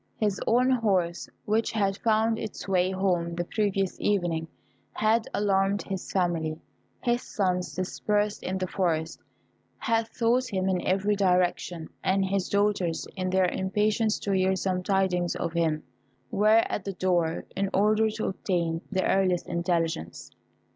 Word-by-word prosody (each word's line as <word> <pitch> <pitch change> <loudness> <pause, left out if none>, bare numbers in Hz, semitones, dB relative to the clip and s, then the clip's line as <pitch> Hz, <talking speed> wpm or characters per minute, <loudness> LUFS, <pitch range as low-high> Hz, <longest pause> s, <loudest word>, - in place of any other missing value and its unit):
His 205 -3 0
own 250 +3 +4
horse, 190 -8 +1 0.2
which 220 +2 +1
had 200 -3 +1
found 225 0 +2
its 215 -2 -6
way 185 -1 +2
home 180 -3 0
the 175 - -1
previous 195 0 -1
evening, 175 -5 0 0.5
had 220 +1 +2
alarmed 200 0 +1
his 190 -1 -5
family. 165 -4 0 0.4
His 240 0 +1
sons, 180 -3 -1
dispersed 205 +3 -1
in 185 +1 -2
the 185 - -1
forest, 165 -4 -1 0.6
had 225 0 0
sought 245 +2 +1
him 190 -4 -1
in 185 -2 +1
every 195 +2 +2
direction; 180 -3 +1 0.2
and 195 +1 +2
his 190 -1 -1
daughters, 200 -5 +1
in 185 -1 -2
their 190 0 +3
impatience 210 +4 +1
to 200 - -2
hear 190 0 +2
some 185 -1 -1
tidings 180 -2 +1
of 165 - -3
him, 160 -2 0 0.5
were 215 +2 +5
at 200 - -3
the 195 - -4
door, 175 -3 0
in 195 0 0
order 215 +2 +3
to 220 0 -4
obtain 170 -4 -1
the 190 -1 0
earliest 185 -2 +2
intelligence. 170 - -2
190 Hz, 145 wpm, -27 LUFS, 180-210 Hz, 0.6 s, were